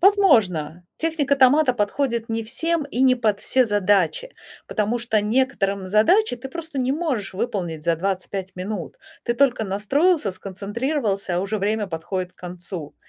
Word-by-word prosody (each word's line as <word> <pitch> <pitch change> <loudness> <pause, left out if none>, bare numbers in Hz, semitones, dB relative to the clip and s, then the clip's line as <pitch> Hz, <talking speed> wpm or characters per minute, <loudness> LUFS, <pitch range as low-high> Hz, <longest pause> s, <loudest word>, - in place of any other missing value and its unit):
Возможно, 205 - +3
техника 310 -4 0
томата 270 +1 +5
подходит 235 +1 -1
не 225 0 -1
всем 325 +8 0
и 260 -2 -1
не 255 -1 +6
под 215 -4 0
все 255 -1 +3
задачи, 205 - +1 0.4
потому 215 +2 -1
что 225 -3 +1
некоторым 210 -4 0
задачи 245 - +3
ты 265 +2 -8
просто 325 -2 -6
не 255 +1 +1
можешь 270 - -2
выполнить 175 -7 -3
за 170 -1 +2
25 190 +1 -3
минут. 185 -1 -5 0.3
Ты 240 - 0
только 255 -4 +2
настроился, 220 - +1
сконцентрировался, 200 - -2
а 180 - +1
уже 210 +2 -2
время 210 +1 0
подходит 180 +1 -4
к - - -47
концу. 175 -3 -5
215 Hz, 150 wpm, -22 LUFS, 195-265 Hz, 0.4 s, не